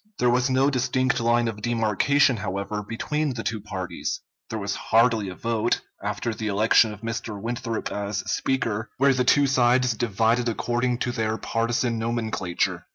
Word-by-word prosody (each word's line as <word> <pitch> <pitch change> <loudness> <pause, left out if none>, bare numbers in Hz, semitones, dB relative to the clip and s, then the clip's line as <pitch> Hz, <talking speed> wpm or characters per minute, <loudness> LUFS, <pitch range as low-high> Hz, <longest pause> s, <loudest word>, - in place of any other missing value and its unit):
There 125 -1 +3
was 125 +2 +2
no 135 +2 +3
distinct 125 -1 +1
line 120 0 +2
of 105 -2 -4
demarcation, 120 +4 +2
however, 100 +1 -3
between 135 +6 -2
the 115 - -4
two 110 -3 -2
parties. 95 -3 -4 0.3
There 110 - -3
was 100 -1 -2
hardly 115 -3 +2
a 95 - -7
vote, 115 +1 0 0.2
after 105 +3 -2
the 110 0 -4
election 110 +2 +4
of 105 -1 -10
Mr. 115 -2 -4
Winthrop 115 +1 -3
as 100 0 -3
Speaker, 115 -4 -1
where 140 +1 +4
the 130 -1 +1
two 145 +3 +4
sides 125 -1 +3
divided 115 +2 +1
according 120 +2 0
to 120 - -1
their 110 -1 -1
partisan 115 +1 -1
nomenclature. 110 -6 -2
115 Hz, 160 wpm, -25 LUFS, 110-125 Hz, 0.3 s, election